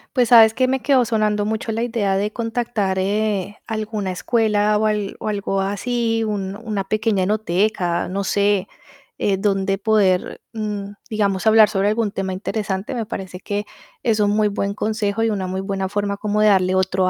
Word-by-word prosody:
Pues, 245 -3 +3
sabes, 225 -2 +8
que 255 +2 +1
me 265 +1 0
quedó 265 -4 +4
sonando 215 -2 +1
mucho 220 +1 -2
la 225 +1 -2
idea 225 -5 0
de 205 +2 -1
contactar, 225 -4 -2
eh, 205 0 -1
alguna 215 -3 -3
escuela, 210 +1 +1
o 215 - +1
al 210 -2 -1
o - - -5
algo 200 -2 -1
así, 225 +3 -1
un 200 -3 -3
una 215 -2 -3
pequeña 215 -1 0
enoteca, 190 -3 0
no 195 +2 -2
sé, 200 0 +1 0.5
eh, 195 -2 +1
donde 195 -1 0
poder, 200 -4 +1
mm, 210 -2 -4 0.2
digamos, 200 -2 0
hablar 220 -1 +7
sobre 200 -2 0
algún 215 -1 0
tema 195 -1 -3
interesante. 195 +3 -3
Me 230 -3 -3
parece, 190 -4 -6
que 205 +2 -3 0.4
es 225 -3 +1
un 205 - +3
muy 210 0 +2
buen 200 0 -2
consejo 215 0 -1
y 225 - +2
una 195 -3 -2
muy 190 +1 -3
buena 195 -1 -3
forma, 205 0 -2
como 210 0 -1
de 215 - +5
darle 185 -2 +3
otro 185 0 +1
205 Hz, 185 wpm, -21 LUFS, 195-220 Hz, 0.5 s, sabes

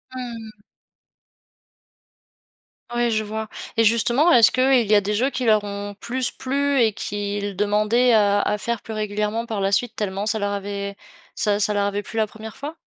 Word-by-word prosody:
Mmh. 225 -4 -8 2.3
Oui, 240 -1 +1
je 215 0 0
vois 220 +1 -5 0.3
et 225 - +4
justement, 235 +9 +3
est-ce 230 -5 +7
qu'il 255 -3 +3
y 210 - +5
a 205 - +5
des 205 +1 -2
jeux 245 +6 +1
qui 255 -3 -3
leur 215 -2 +4
ont 205 0 -5
plus 255 +1 -1
plu 280 +1 0
et 225 - +4
qu'ils 205 0 -4
demandaient 210 +5 +2
à 205 -2 +4
à 210 +1 0
faire 235 0 -3
plus 220 - -8
régulièrement 210 +2 -2
par 215 -4 -3
la 195 +1 +1
suite, 225 +3 0
tellement 200 -1 -3
ça 220 0 0
leur 205 0 -1
avait 200 0 -4 0.4
ça 205 -1 +1
ça 210 0 +1
leur 200 0 +1
avait 205 0 -1
plu 225 - -9
la 220 - +3
première 220 +1 -11
fois? 295 +3 -6
215 Hz, 185 wpm, -22 LUFS, 205-235 Hz, 2.3 s, est-ce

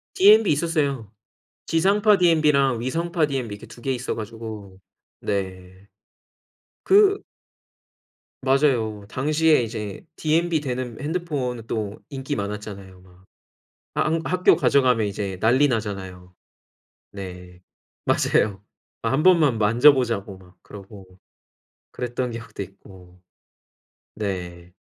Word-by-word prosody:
디엠비 210 +2 +6
있었어요. 145 - -1 0.6
지상파 200 +5 +3
디엠비랑 150 -8 +3
위성파 165 +5 0
디엠비 130 -7 -3
이렇게 105 - -11
2 120 - -14
개 135 - -1
있어 125 0 -3
가지고 110 -3 -8 0.4
네. 95 0 -5 1.0
그 400 0 +5 1.2
맞아요. 130 -7 +1
당시에 155 +4 +2
이제 110 - -5
디엠비 160 +1 +1
되는 125 -4 -4
핸드폰은 140 -7 -3
또 105 -3 -4
인기 140 0 -4
많았잖아요. 100 -2 -6
막. 90 0 -20 0.8
하 - - +1
한 160 +1 0
학교 185 +1 +4
가져가면 125 -5 +3
이제 100 -1 -4
난리 130 +6 +4
나잖아요. 95 -6 -4 0.8
네, 90 -2 -9 0.5
맞아요. 100 -1 +1 0.4
1 135 +6 0
번만 160 -9 +5
만져보자고 115 -3 +3
막 90 -1 -19
그러고 100 -1 -12 0.8
그랬던 125 0 -3
기억도 115 -3 -8
있고. 90 -1 -16 0.9
네. 90 -4 -5
115 Hz, 235 characters per minute, -23 LUFS, 100-150 Hz, 1.2 s, 디엠비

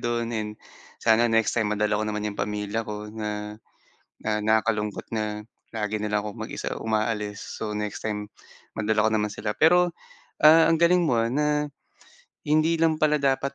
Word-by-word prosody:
don, 120 -1 -1
and 105 -1 -3 0.4
sana 115 +1 +4
next 115 -1 +2
time 110 -2 +1
madala 105 0 +1
ko - - 0
naman 105 0 -3
'yong 100 - -8
pamilya 105 +2 -2
ko 105 0 -6
na, 105 -1 -5 0.7
na - - -2
nakakalungkot 110 -1 0
na 105 -1 -3 0.3
lagi 105 -1 -2
na 105 - -2
lang 105 0 +1
akong 105 -1 -7
mag-isa - - -4
umaalis. 105 -2 -1 0.2
So 110 -1 -3
next 105 -1 -4
time 105 -1 -3 0.5
madala 110 0 +1
ko - - 0
naman 105 -1 0
sila, 105 +1 -3
pero, 175 +2 +4 0.5
ah, 160 +2 +8
ang 165 - +3
galing 175 +2 +4
mo 120 -5 +2
na 150 +2 +1 0.8
hindi 155 +2 +3
lang 160 -1 +2
pala 150 0 +3
dapat 135 0 +1
110 Hz, 170 wpm, -25 LUFS, 105-135 Hz, 0.8 s, ah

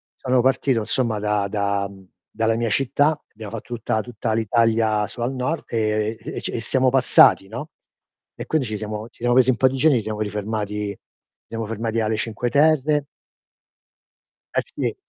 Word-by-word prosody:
sono 130 -1 +1
partito 130 -2 +2
insomma 115 -1 0
da 105 -1 0
da 100 -1 0
mhmm, 95 -1 -15 0.2
dalla 115 0 +1
mia 115 0 -1
città, 140 +6 +2
abbiamo 110 -1 -9
fatto 115 +2 -7
tutta- 110 -1 -1
tutta 115 -1 -3
l'Italia 110 -1 +2
su 120 - -9
al 120 +3 0
nord 135 +6 -2
e 110 -1 0
e - - -6
c - - -4
e - - -3
siamo 130 +3 +2
passati, 125 -6 +5
no. 120 +9 -7 0.7
E - - -6
quindi 150 -6 0
ci 110 - -3
siamo 105 +1 -5
ci - - -29
siamo 120 0 +2
presi 130 0 +5
un - - 0
po' 130 - +5
di 130 - -4
giorni, 145 0 +4
ci 115 - 0
siamo 110 -1 -4
rifermati 105 0 -3
ci - - -30 0.5
siamo 115 -1 -4
fermati 115 +1 -2
alle 110 0 0
Cinque 115 +2 -2
Terre 150 0 +3 1.5
Eh - - +2
sì. - - -3
115 Hz, 185 wpm, -22 LUFS, 105-130 Hz, 1.5 s, passati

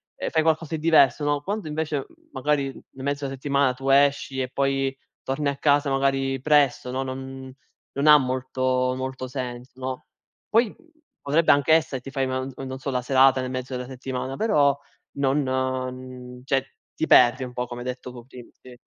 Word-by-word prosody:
ehm, - - -4
fai 160 - +2
qualcosa 160 0 0
di 155 - -6
diverso, 155 -3 +4
no. 145 -1 +1
Quando 200 +1 -4
invece 150 -2 -2 0.3
magari 140 +1 0
in 135 0 -11
mezzo 140 0 -2
alla 135 - -4
settimana 140 -1 +1
tu 135 +1 -4
esci 140 -1 +3
e 130 - -3
poi 135 0 0 0.3
torni 140 +2 -2
a 140 - -2
casa 145 0 +2
magari 135 -1 0
presto, 140 -4 +2
no, 130 +1 -2
non 130 0 -7 0.4
non 140 +2 +1
ha 150 0 +10
molto 130 -1 0
molto 130 0 -4
senso, 125 -1 -6
no. 130 0 -5 0.4
Poi 225 -1 +2 0.5
potrebbe 155 +4 +3
anche 145 +2 +3
essere 150 -5 +1
ti 135 - -9
fai 135 -2 0
no 130 +1 -3
non 130 0 -6
so 140 - -4
la 125 -1 -1
serata 130 0 +4
nel 130 0 -3
mezzo 130 0 -4
della 125 0 -4
settimana, 130 0 -5
però 145 -10 +3 0.4
non 130 -2 -2
cioè, 135 0 0 0.3
ti 160 - -1
perdi 125 0 +5
un 125 -1 -7
po' 125 0 -3
come 120 0 -7
hai 125 - -6
detto 125 0 -5
cu 120 -1 -11
prim 125 -2 -13
sì. 125 -1 -15
135 Hz, 185 wpm, -24 LUFS, 130-140 Hz, 0.5 s, ha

